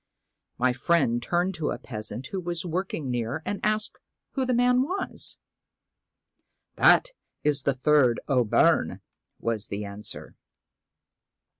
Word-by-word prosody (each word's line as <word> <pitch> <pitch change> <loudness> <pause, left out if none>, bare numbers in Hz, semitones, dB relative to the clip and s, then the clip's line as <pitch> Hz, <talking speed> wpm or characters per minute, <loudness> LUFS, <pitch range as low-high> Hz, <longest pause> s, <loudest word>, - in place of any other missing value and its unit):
My 125 0 +2
friend 125 -3 +1
turned 175 +8 0
to 160 -4 -2
a - - -2
peasant 115 +2 -5
who 195 - -2
was 175 0 -3
work 180 +3 -2
ing 135 -5 -3
near 120 +6 -2
and 205 - -3
asked 215 0 0 0.3
who 265 -2 -1
the 255 - +1
man 250 +1 +4
was. 365 +9 +1 1.4
1 - - +4
That - - +6 0.3
is 145 -2 +1
the 140 - +1
third 130 -3 +3
O'Byrne,' 125 -6 +2 0.4
was 115 -3 -1
the 105 +1 -4
answer. 100 +1 -6
150 Hz, 135 wpm, -26 LUFS, 120-190 Hz, 1.4 s, That